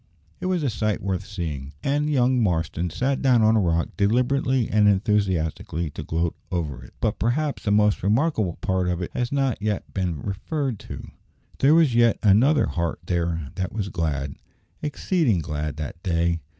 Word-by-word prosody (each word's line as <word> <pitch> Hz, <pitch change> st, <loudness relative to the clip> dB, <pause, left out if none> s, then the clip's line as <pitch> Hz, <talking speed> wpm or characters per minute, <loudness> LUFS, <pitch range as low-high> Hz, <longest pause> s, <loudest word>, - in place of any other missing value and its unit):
It -, -, -3 dB
was 180 Hz, -4 st, 0 dB
a 140 Hz, -, +1 dB
sight 105 Hz, 0 st, -1 dB
worth 95 Hz, 0 st, -2 dB
seeing, 75 Hz, -9 st, -5 dB
and 145 Hz, +2 st, +1 dB
young 130 Hz, -3 st, +3 dB
Marston 85 Hz, -3 st, 0 dB
sat 130 Hz, -, -1 dB
down 125 Hz, -4 st, +4 dB
on 110 Hz, +1 st, +5 dB
a -, -, +4 dB
rock, 85 Hz, -3 st, +1 dB
deliberately 125 Hz, +4 st, +2 dB
and 105 Hz, 0 st, +3 dB
enthusiastically, 95 Hz, -6 st, 0 dB
to -, -, -7 dB
gloat 80 Hz, +1 st, -1 dB, 0.2 s
over 75 Hz, -8 st, -3 dB
it. -, -, -15 dB
But 105 Hz, -, -1 dB
perhaps 140 Hz, +6 st, 0 dB
the -, -, -2 dB
most 105 Hz, 0 st, +3 dB
remarkable 110 Hz, -, +1 dB
part 95 Hz, -1 st, 0 dB
of 90 Hz, 0 st, -1 dB
it -, -, -6 dB
has 125 Hz, 0 st, -2 dB
not 135 Hz, -5 st, 0 dB
yet 105 Hz, -1 st, -2 dB
been 90 Hz, -5 st, -1 dB
referred 115 Hz, -, -3 dB
to. -, -, -7 dB, 0.5 s
There 145 Hz, +4 st, +5 dB
was 160 Hz, -7 st, +4 dB
yet 120 Hz, -1 st, +4 dB
another 120 Hz, +9 st, +5 dB
heart 85 Hz, -2 st, -2 dB
there 85 Hz, -4 st, -1 dB
that 95 Hz, -2 st, -3 dB
was 100 Hz, -2 st, -2 dB
glad 75 Hz, -5 st, -2 dB, 0.5 s
exceeding 150 Hz, -, +1 dB
glad 75 Hz, -1 st, -3 dB
that 75 Hz, +3 st, -6 dB
day. 85 Hz, -1 st, +1 dB
100 Hz, 175 wpm, -24 LUFS, 85-125 Hz, 0.5 s, on